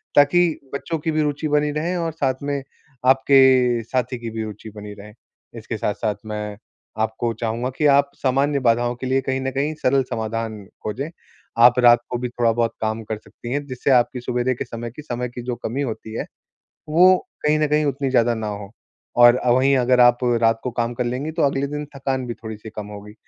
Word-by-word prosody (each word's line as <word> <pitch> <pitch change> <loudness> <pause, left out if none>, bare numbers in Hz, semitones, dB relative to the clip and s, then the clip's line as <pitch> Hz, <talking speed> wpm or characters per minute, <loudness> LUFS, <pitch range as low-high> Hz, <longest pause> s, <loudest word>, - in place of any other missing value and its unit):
ताकि 160 +3 +4
बच्चों 165 +3 -3
की 160 +2 -2
भी 155 0 +1
रुचि 150 +1 -1
बनी 150 0 +1
रहे 165 +5 -2
और 165 -2 -1
साथ 135 -3 -2
में 140 -1 -2 0.4
आपके 130 -2 +5
साथी 125 +1 -2
की 115 - -5
भी 110 0 -4
रुचि 110 +1 -8
बनी 105 0 -8
रहे। 105 +1 -12 0.4
इसके 110 0 -5
साथ-साथ 105 0 -1
मैं 105 -1 -5 0.4
आपको 110 +1 -1
चाहूँगा 115 +3 -2
कि 150 - +1
आप 140 0 +2
सामान्य 140 +2 +1
बाधाओं 120 +1 +2
के 130 +1 -5
लिए 135 +1 +2
कहीं 130 0 -2
न 135 0 -2
कहीं 140 +4 -1
सरल 135 +1 +3
समाधान 110 -2 -4 0.2
खोजें, 135 +9 -3 0.5
आप 120 +1 +6
रात 120 -1 +7
को 125 - -2
भी 125 0 -3
थोड़ा 120 -1 +1
बहुत 115 0 0
काम 110 +1 -2
कर 110 0 -4
सकती 120 +2 -10
हैं, 145 +2 -2
जिससे 130 0 -1
आपकी 125 0 +3
सुविधा 125 +1 0
के 125 - -5
समय 115 0 -6
की 140 - -10
समय 125 -4 -4
की 120 +1 -8
जो 125 -1 -3
कमी 120 +3 -4
होती 110 -4 -5
है, - - -3 0.6
वो 180 +4 +6 0.3
कहीं 150 +1 +3
न 155 - +2
कहीं 150 0 +2
उतनी 140 -1 -1
ज़्यादा 120 -2 +3
ना 110 -1 -4
हो। 100 -1 -6 0.5
और 120 +1 +7
वहीं 130 +3 +4
अगर 125 0 +3
आप 120 0 +6 0.2
रात 115 0 +3
को 125 - -2
काम 120 0 -2
कर 125 - -2
लेंगी, 130 +6 -2
तो 165 - -1
अगले 140 0 +1
दिन 150 +1 -4
थकान 135 -1 -2
भी 120 - -4
थोड़ी-सी 110 -1 -9
कम 105 -1 -7
होगी 105 0 -10
125 Hz, 210 wpm, -22 LUFS, 115-140 Hz, 0.6 s, रात